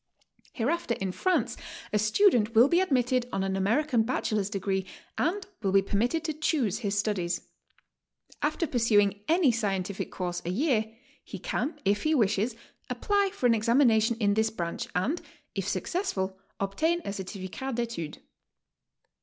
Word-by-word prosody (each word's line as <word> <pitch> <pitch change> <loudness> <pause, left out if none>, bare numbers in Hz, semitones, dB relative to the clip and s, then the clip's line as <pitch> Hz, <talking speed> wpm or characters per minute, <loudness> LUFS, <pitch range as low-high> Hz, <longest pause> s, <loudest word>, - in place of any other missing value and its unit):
Hereafter 270 +1 0
in 190 -1 -3
France 370 - 0 0.4
a 210 - +3
student 225 - +3
will 235 +4 +8
be 345 +4 +3
admitted 255 -7 +1
on 195 - -1
an 195 0 -1
/American 225 +6 +2
bachelor's 215 -4 -1
degree, 195 -2 -2 0.3
and 380 +5 0 0.2
will 195 -3 0
be 195 0 +5
permitted 240 - 0
t'o 320 -1 -2
choose 250 - +1
his 205 -3 -1
studies. 185 -5 0 1.0
After 310 +3 0
pursuing 210 -6 +2
any 325 -4 +4
scientific 200 -4 -2
course 175 -1 -3
a 170 - -3
year, 220 - +1 0.3
he - - -8
can, 270 - -3
if 205 +1 +2
he 310 0 +2
wishes, 220 -1 +1 0.3
apply 405 -1 +1
for 315 - -4
an 240 - +6
examination 230 0 +3
in 205 -2 +3
this 220 +1 +2
branch, 170 -5 -4
and, 265 - 0 0.3
if - - -3
successful, 195 - -2 0.2
obtain 320 - 0
a 200 - -3
certificat 195 +6 -5
d' 240 - 0
etude. 200 -10 -4
220 Hz, 150 wpm, -28 LUFS, 195-275 Hz, 1.0 s, will